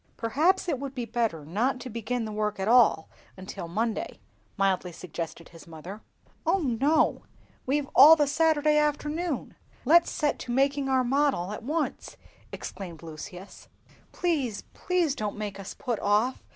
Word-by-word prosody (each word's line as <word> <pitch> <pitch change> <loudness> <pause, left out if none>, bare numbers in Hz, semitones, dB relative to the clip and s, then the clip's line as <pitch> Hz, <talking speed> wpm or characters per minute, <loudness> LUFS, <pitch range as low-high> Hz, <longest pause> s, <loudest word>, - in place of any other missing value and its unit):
"Perhaps 315 - +1
it 280 -7 -1
would 275 0 -6
be 245 -2 -3
better 225 -11 -2
not 235 - 0
to - - -7
begin 235 0 -3
the 215 - -5
work 210 -1 -2
at 190 - -2
all 230 -8 +5 0.3
until 185 -2 -7
Monday," 220 +6 -2 0.4
mildly 190 -2 +1
suggested 170 -1 -7
his 165 -1 -15
mother. 170 +6 -9 0.4
"O 345 +4 +2
no, 285 -1 +1 0.5
we've 280 +1 0
all 300 +5 +10
the 300 -2 +2
Saturday 300 0 +2
afternoon, 300 +1 -2 0.3
let's 335 +5 +5
set 295 -2 -1
to 245 - -6
making 275 +2 +1
our 260 -1 +3
model 265 -8 +1
at 210 - -6
once!" 305 +6 -3 0.3
exclaimed 170 -5 -8
Lucius. 170 +4 -10 0.4
"Please, 285 - -1
please, 355 -6 0
don't 210 -5 -4
make 205 -2 -5
us 195 - -8
put 245 -6 -3
off!" 210 +5 +1
245 Hz, 150 wpm, -27 LUFS, 200-295 Hz, 0.5 s, all